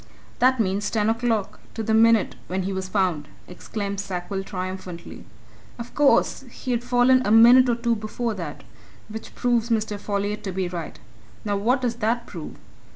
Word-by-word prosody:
"That 255 Hz, 0 st, +4 dB
means 200 Hz, -1 st, 0 dB
ten 220 Hz, -1 st, +1 dB
o'clock 230 Hz, -3 st, -1 dB, 0.2 s
to 225 Hz, -, -3 dB
the 220 Hz, -, 0 dB
minute 225 Hz, -1 st, +4 dB
when 185 Hz, +1 st, -2 dB
he 195 Hz, +1 st, -3 dB
was 190 Hz, 0 st, -3 dB
found!" 180 Hz, -7 st, 0 dB, 0.2 s
exclaimed 200 Hz, +2 st, -5 dB
Sackville 190 Hz, 0 st, -4 dB
triumphantly. 185 Hz, -2 st, -7 dB, 0.5 s
"Of 235 Hz, 0 st, -8 dB
course, 290 Hz, -2 st, +3 dB
he'd 245 Hz, -2 st, -3 dB
fallen 245 Hz, +1 st, +4 dB
a -, -, -1 dB
minute 240 Hz, +3 st, +7 dB
or 240 Hz, -, +2 dB
two 235 Hz, 0 st, 0 dB
before 220 Hz, +2 st, -3 dB
that 170 Hz, -7 st, -7 dB, 0.5 s
which 220 Hz, +1 st, -8 dB
proves 240 Hz, -2 st, +1 dB
Mr. 215 Hz, -2 st, -1 dB
Folliot 205 Hz, +1 st, -2 dB
to 190 Hz, -, -2 dB
be 185 Hz, 0 st, -2 dB
right. 175 Hz, -2 st, -6 dB, 0.5 s
Now 205 Hz, -1 st, 0 dB
what 240 Hz, +7 st, +1 dB
does 235 Hz, -1 st, -1 dB
that 235 Hz, +1 st, 0 dB
prove? 165 Hz, -8 st, -8 dB
215 Hz, 165 wpm, -24 LUFS, 190-235 Hz, 0.5 s, minute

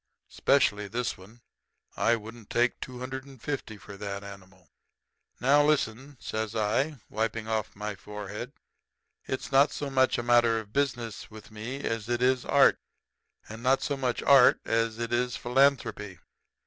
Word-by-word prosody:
Specially 105 Hz, -7 st, +2 dB
this 120 Hz, +4 st, -2 dB
one. 105 Hz, +6 st, -16 dB, 0.5 s
I 115 Hz, -, +3 dB
wouldn't 115 Hz, 0 st, -10 dB
take 120 Hz, +1 st, +1 dB
two 125 Hz, -1 st, -7 dB
hundred 130 Hz, +1 st, -5 dB
and 135 Hz, -2 st, -15 dB
fifty 125 Hz, -5 st, -5 dB
for 100 Hz, 0 st, -11 dB
that 100 Hz, 0 st, -5 dB
animal.' 95 Hz, -3 st, -13 dB, 0.7 s
"'Now, 140 Hz, +4 st, +5 dB
listen,' 140 Hz, -2 st, 0 dB
says 110 Hz, 0 st, -4 dB
I, 115 Hz, +8 st, 0 dB
wiping 110 Hz, 0 st, -2 dB
off 110 Hz, -1 st, -2 dB
my 105 Hz, +1 st, -4 dB
forehead. 105 Hz, +4 st, -7 dB, 0.8 s
'It's 130 Hz, -, -4 dB
not 140 Hz, +2 st, +5 dB
so 145 Hz, -1 st, -4 dB
much 130 Hz, -1 st, +3 dB
a 120 Hz, -, -2 dB
matter 120 Hz, -1 st, +4 dB
of 105 Hz, -1 st, -11 dB
business 120 Hz, -6 st, -2 dB
with 110 Hz, -1 st, -13 dB
me 115 Hz, +6 st, -6 dB
as 115 Hz, 0 st, -3 dB
it 120 Hz, 0 st, 0 dB
is 130 Hz, -1 st, +2 dB
art; 140 Hz, -1 st, +5 dB, 0.7 s
and 110 Hz, +2 st, -9 dB
not 130 Hz, +2 st, +2 dB
so 145 Hz, -, -1 dB
much 130 Hz, -3 st, -2 dB
art 135 Hz, -3 st, +6 dB
as 115 Hz, 0 st, 0 dB
it 115 Hz, 0 st, -3 dB
is 125 Hz, 0 st, 0 dB
philanthropy. 125 Hz, -7 st, +1 dB
115 Hz, 160 wpm, -28 LUFS, 105-130 Hz, 0.8 s, art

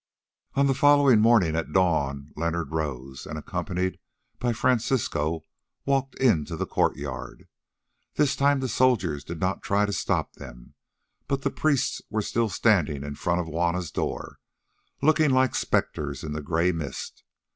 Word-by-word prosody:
On 140 Hz, -, +3 dB
the 135 Hz, -, +3 dB
following 145 Hz, -4 st, +5 dB
morning 110 Hz, -8 st, +4 dB
at 80 Hz, -, -2 dB
dawn 75 Hz, -6 st, +1 dB
Leonard 85 Hz, -1 st, -2 dB
rose 70 Hz, -4 st, -4 dB
and, 75 Hz, -, -5 dB
accompanied 90 Hz, +4 st, -3 dB, 0.4 s
by 120 Hz, -, 0 dB
Francisco, 110 Hz, -, 0 dB, 0.4 s
walked 135 Hz, -1 st, 0 dB
into 95 Hz, -, +2 dB
the -, -, -1 dB
courtyard. 70 Hz, -3 st, -2 dB, 0.7 s
This 145 Hz, -2 st, +2 dB
time 140 Hz, 0 st, +2 dB
the 130 Hz, -, -1 dB
soldiers 105 Hz, -, +1 dB
did 80 Hz, +2 st, -7 dB
not 95 Hz, +2 st, -1 dB
try 100 Hz, +1 st, +1 dB
to 100 Hz, -, -3 dB
stop -, -, -1 dB
them, -, -, -12 dB, 0.5 s
but 140 Hz, 0 st, -1 dB
the 140 Hz, -, 0 dB
priests 150 Hz, -4 st, 0 dB
were 110 Hz, -1 st, -1 dB
still 115 Hz, +2 st, 0 dB
standing 90 Hz, -8 st, +2 dB
in 70 Hz, 0 st, -5 dB
front 85 Hz, +4 st, 0 dB
of -, -, -5 dB
Juanna's 85 Hz, 0 st, -1 dB
door, -, -, -4 dB, 0.6 s
looking 155 Hz, 0 st, +4 dB
like 130 Hz, -1 st, +3 dB
spectres 70 Hz, -2 st, -1 dB
in 75 Hz, -1 st, -4 dB
the 75 Hz, -, -4 dB
grey 85 Hz, +4 st, +1 dB
mist. 75 Hz, -6 st, -6 dB
90 Hz, 150 wpm, -26 LUFS, 75-130 Hz, 0.7 s, following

